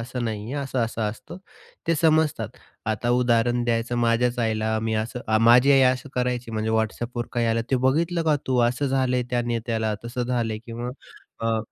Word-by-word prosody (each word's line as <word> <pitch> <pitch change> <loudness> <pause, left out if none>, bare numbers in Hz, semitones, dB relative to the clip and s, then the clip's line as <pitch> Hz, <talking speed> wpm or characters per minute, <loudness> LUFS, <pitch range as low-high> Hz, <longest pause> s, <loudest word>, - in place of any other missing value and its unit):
असं 125 +1 -4
नाहीये, 110 +3 -4
असं-असं 130 -5 -2
असतं. 110 +11 -5 0.5
ते 165 - +3
समजतात. 155 -1 +2 0.4
आता 110 +2 -1
उदाहरण 120 0 +2
द्यायचं 120 0 0
माझ्याच 120 +1 +1
आईला 110 -1 0
मी 110 0 -1
असं 110 +3 -3 0.2
माझी 125 +4 +6
आई 135 - +6
असं 130 +2 -7
करायची 125 -1 -1
म्हणजे 110 0 -2
WhatsAppवर 115 +2 -1
काही 120 -1 +1
आलं, 115 0 +1
ते 135 - +3
बघितलं 165 +5 +1
का 155 -2 +3
तू? 130 -1 +1
असं 125 +4 -2
झालंय 130 -2 +1
त्या 120 -1 +1
नेत्याला, 115 -2 -1
तसं 120 +1 -3
झालं. 120 -3 -1
किंवा 120 +1 -5 0.6
अ 110 - +1
120 Hz, 170 wpm, -24 LUFS, 115-125 Hz, 0.6 s, माझी